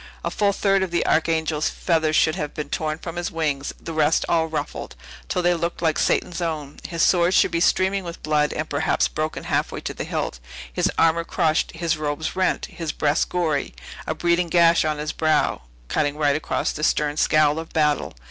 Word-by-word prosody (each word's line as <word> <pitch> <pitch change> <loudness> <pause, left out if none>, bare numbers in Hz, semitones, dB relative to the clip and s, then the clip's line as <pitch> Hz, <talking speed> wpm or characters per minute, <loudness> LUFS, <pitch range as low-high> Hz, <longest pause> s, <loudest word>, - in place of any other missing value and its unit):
A - - -1
full 205 -1 +2
third 195 0 +2
of 190 - -1
the 170 - 0
Archangel's 160 -1 +1
feathers 160 -3 0
should 155 - +4
have 150 -4 -4
been 150 - -5
torn 155 -1 -2
from 165 +1 -7
his 175 - -2
wings; 145 -4 -1
the 165 - -7
rest 155 0 +2
all 165 -1 +2
ruffled, 160 -1 -5 0.3
till 180 - 0
they 175 0 +4
looked 170 0 -2
like 160 -2 +2
Satan's 175 0 0
own! 155 -4 -4
His 170 -2 0
sword 175 0 +3
should - - +4
be 170 - 0
streaming 190 +2 +2
with 170 -1 -8
blood, 150 -1 +1
and 155 - -3
perhaps 145 +2 +1
broken 155 0 -3
halfway - - -1
to - - -4
the - - -5
hilt; 60 - -3 0.3
his - - +1
armor 165 +1 +3
crushed, 165 -2 0
his 165 -2 -1
robes 155 +2 -3
rent, 185 0 +1
his 165 -3 -5
breast 150 +2 0
gory; 160 -5 -1 0.3
a 155 - -1
bleeding 170 +1 +1
gash 170 0 +5
on 155 -1 -1
his 150 +1 -3
brow, 155 -1 +1 0.3
cutting 145 - 0
right 145 -2 +2
across 155 - -1
the 155 - -6
stern 150 -1 +1
scowl 155 0 +3
of 165 - -8
battle! 150 -2 +1
160 Hz, 200 wpm, -23 LUFS, 150-170 Hz, 0.3 s, gash